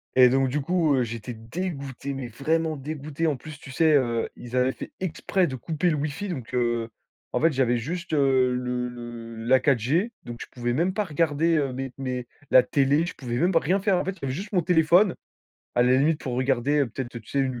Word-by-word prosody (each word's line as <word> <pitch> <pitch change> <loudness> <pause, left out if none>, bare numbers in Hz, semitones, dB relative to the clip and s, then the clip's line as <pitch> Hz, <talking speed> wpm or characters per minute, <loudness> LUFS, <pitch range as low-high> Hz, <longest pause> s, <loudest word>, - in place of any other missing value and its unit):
et 125 -1 +8
donc 135 +1 +2
du 150 +3 0
coup, 165 0 +2
heu, 125 - +2
j'étais 115 +1 -6
dégoûté, 140 +1 -5
mais 135 -3 -5
vraiment 155 +6 0
dégoûté. 150 +2 -4
En 150 - +1
plus, 150 +4 -10
tu 135 - -12
sais, 155 +3 +3
heu, 120 -5 +2
ils 120 +1 -6
avaient 125 +1 +3
fait - - -9
exprès 185 +1 0
de 130 -3 -4
couper 160 +7 -1
le 155 - +1
wifi, 150 +8 -3
donc 130 -10 -6
heu, 120 -2 0 0.4
en - - 0
fait, 165 - +4
j'avais 125 -3 +2
juste, 170 +7 -5
heu, 135 -3 +3
le 125 0 -2
le 120 -1 -8
la 130 +1 +6
4G, 140 - +1
donc 120 - -7
je - - -7
pouvais 120 -1 -2
même 175 +6 +1
pas 210 +2 -1
regarder, 160 0 +1
heu, 140 -3 0
mes 130 0 -5
mes 125 -2 -4 0.2
la 130 - +8
télé. 145 +5 +2
Je - - -5
pouvais 120 -3 -4
même 175 +6 +2
pas 165 - +5
rien 190 +6 +1
faire, 195 -1 +2
en 180 - 0
fait. 190 0 -3
J'avais 135 -2 -2
juste 200 +6 -6
mon 180 - +3
téléphone, 175 +3 +4 0.6
à 120 - +4
la 125 +1 +4
limite 155 +2 +2
pour 130 - -4
regarder, 130 +2 +1
heu, 140 - +2
peut-être, 120 +1 -6
tu 110 - -18
sais, 140 - 0
1 130 -2 -1
ou - - -7
135 Hz, 230 wpm, -25 LUFS, 125-160 Hz, 0.6 s, et